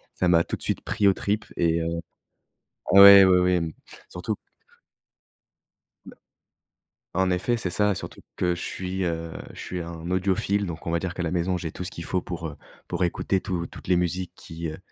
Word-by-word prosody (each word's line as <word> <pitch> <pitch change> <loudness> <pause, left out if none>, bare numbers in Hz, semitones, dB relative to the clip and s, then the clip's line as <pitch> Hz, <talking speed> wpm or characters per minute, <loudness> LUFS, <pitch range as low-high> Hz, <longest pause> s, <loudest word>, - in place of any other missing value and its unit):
ça 90 - +1
m'a 85 -1 +5
tout - - -4
de - - -20
suite - - -1
pris 100 - +1
aux 95 - +6
tripes 105 +3 -2
et 85 0 +2
heu, 85 0 -2 1.0
ah 100 - +9
ouais, 100 0 +11
oui, 90 -1 +5
oui, 90 0 +3
m 80 -3 -1 0.4
surtout 90 +5 -4 1.7
b - - -11 1.0
en 95 0 +2
effet, 90 +7 0
c'est 95 - -3
ça, 105 +3 +2
surtout - - -7 0.2
que 90 -1 +1
je - - -7
suis, 95 0 -3
heu, 80 -1 -3 0.2
je - - -12
suis 90 -1 -5
un 85 0 -7
audiophile 95 +2 +1
donc 85 -1 -7
on - - 0
va 85 - +2
dire 90 -1 -4
qu'à 90 - -5
la 80 - -1
maison, 90 +1 0
j'ai 80 -2 -5
tout 90 - -6
ce 90 - -4
qu'il 85 - -7
faut 90 -1 -1
pour, 85 -2 -5
heu, 75 - -9 0.3
pour - - -1
écouter 90 +2 0
tout 85 -3 -3
toutes - - -13
les 90 -1 +3
musiques 90 +1 -1
qui, 80 0 -7
heu, 80 - -7
90 Hz, 210 wpm, -25 LUFS, 85-95 Hz, 1.7 s, ouais